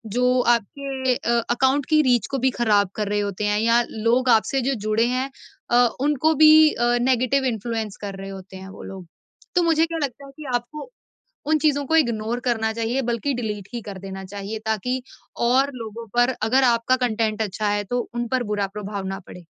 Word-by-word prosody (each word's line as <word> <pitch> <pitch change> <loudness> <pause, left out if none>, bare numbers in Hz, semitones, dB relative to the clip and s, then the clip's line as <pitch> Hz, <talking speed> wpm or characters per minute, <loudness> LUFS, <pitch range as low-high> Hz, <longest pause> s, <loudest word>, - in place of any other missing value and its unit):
जो 250 0 +3
आपके 260 +3 0
अ, 235 0 0
अकाउंट 265 +3 +2
की 305 -1 +5
रीच 245 -4 +2
को 270 - 0
भी 260 +1 +3
खराब 210 -5 +2
कर 210 -2 -2
रहे 210 - 0
होते 205 0 -2
हैं 210 0 +1
या 230 +2 +4
लोग 235 +4 +1
आपसे 245 +4 +3
जो 275 - +1
जुड़े 220 +2 +2
हैं 255 +2 -1 0.4
अ, 245 0 +5
उनको 300 +2 +2
भी 310 +1 +7
अ, 240 - 0 0.2
नेगेटिव 260 +2 +2
इन्फ्लुएंस 225 -3 -3
कर 200 -1 -5
रहे 195 0 -7
होते 190 0 -10
हैं 190 0 -10
वो - - -11
लोग। 190 -2 -9 0.5
तो 355 - +4
मुझे 325 -1 +3
क्या 330 0 -5
लगता 275 +1 -5
है 275 - -12
कि 305 - -9
आपको 270 - -5 0.6
उन 310 0 +3
चीज़ों 285 -2 +1
को 320 - +1
इग्नोर 235 -5 +1
करना 220 -1 0
चाहिए 230 +4 -1
बल्कि 235 +5 -1
डिलीट 210 -5 -4
ही 235 - -4
कर 200 -2 -8
देना 190 0 -7
चाहिए। 205 +3 -6
ताकि 250 +4 -1 0.5
और 270 +3 +3
लोगों 230 -1 -7
पर 245 +1 +3
अगर 265 +2 +4
आपका 240 +1 +3
कंटेंट 220 -2 -1
अच्छा 210 0 -1
है 205 0 0
तो 245 +4 -2
उन 240 0 -2
पर 255 +1 0
बुरा 200 -1 0
प्रभाव 200 -1 -5
ना 195 0 -4
पड़े। 180 -2 -12
235 Hz, 200 wpm, -23 LUFS, 210-260 Hz, 0.6 s, भी